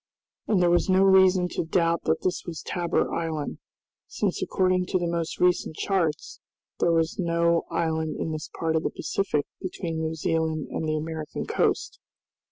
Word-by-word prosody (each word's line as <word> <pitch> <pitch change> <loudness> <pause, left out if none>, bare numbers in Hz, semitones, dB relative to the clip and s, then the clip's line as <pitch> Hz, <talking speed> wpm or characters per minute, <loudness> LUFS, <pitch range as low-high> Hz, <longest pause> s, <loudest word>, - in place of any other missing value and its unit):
And 205 - +3
there 175 -1 +4
was 175 +2 +2
no 190 +1 +5
reason 190 -1 +5
to - - -2
doubt 165 0 +1
that 160 0 +1
this 185 -1 -1
was 165 -3 -6
Tabor 175 -1 -1
Island, 160 -3 -3 0.5
since - - -2
according 185 -1 +1
to - - +1
the 175 - -1
most 170 -1 -2
recent 180 -3 +2
charts 170 -6 -1 0.4
there 170 - +3
was 165 +1 +1
no 170 -1 +2
island 160 -1 -1
in 160 - -2
this 155 0 -5
part 160 -1 0
of 160 - +2
the - - -1
Pacific 150 -7 -1 0.2
between 170 -3 -4
New 160 0 -2
Zealand 160 -1 -1
and 160 - -2
the 155 - +1
American 155 0 -4
Coast. - - 0
170 Hz, 175 wpm, -26 LUFS, 160-180 Hz, 0.5 s, no